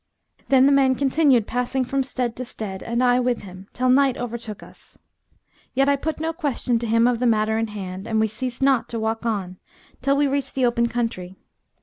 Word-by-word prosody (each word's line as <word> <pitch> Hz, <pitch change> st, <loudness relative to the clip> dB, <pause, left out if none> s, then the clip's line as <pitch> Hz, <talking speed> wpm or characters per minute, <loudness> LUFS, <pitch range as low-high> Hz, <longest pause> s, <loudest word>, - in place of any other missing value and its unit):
Then 265 Hz, -1 st, +6 dB
the 280 Hz, -, +5 dB
man 270 Hz, -2 st, +4 dB
continued 270 Hz, -3 st, +3 dB
passing 250 Hz, +3 st, -1 dB
from 275 Hz, +2 st, -1 dB
stead 250 Hz, -3 st, -3 dB
to 255 Hz, -, -3 dB
stead 210 Hz, -5 st, -5 dB
(and 235 Hz, +2 st, -1 dB
I 245 Hz, 0 st, +4 dB
with 245 Hz, -2 st, -1 dB
him) 185 Hz, 0 st, -11 dB
till 255 Hz, 0 st, -1 dB
night 265 Hz, 0 st, +4 dB
overtook 230 Hz, -3 st, -6 dB
us. -, -, -16 dB, 0.8 s
Yet 270 Hz, +1 st, +3 dB
I 280 Hz, -, +4 dB
put 305 Hz, +3 st, -4 dB
no 325 Hz, +1 st, -2 dB
question 270 Hz, -7 st, -1 dB
to 235 Hz, -, -4 dB
him 230 Hz, +1 st, +3 dB
of 245 Hz, -2 st, +1 dB
the 250 Hz, -, +2 dB
matter 220 Hz, -1 st, +2 dB
in 225 Hz, -, -1 dB
hand 195 Hz, -1 st, -7 dB
and 220 Hz, -1 st, 0 dB
we 220 Hz, -, +3 dB
ceased 240 Hz, +4 st, -4 dB
not 270 Hz, -3 st, +2 dB
to 230 Hz, -, -3 dB
walk 225 Hz, +1 st, -2 dB
on, 190 Hz, -5 st, -3 dB, 0.4 s
till 275 Hz, +2 st, +2 dB
we 290 Hz, -, +3 dB
reached 275 Hz, -1 st, -2 dB
the 260 Hz, -2 st, +2 dB
open 235 Hz, 0 st, +2 dB
country. 225 Hz, -6 st, -3 dB
245 Hz, 215 wpm, -23 LUFS, 220-270 Hz, 0.8 s, Then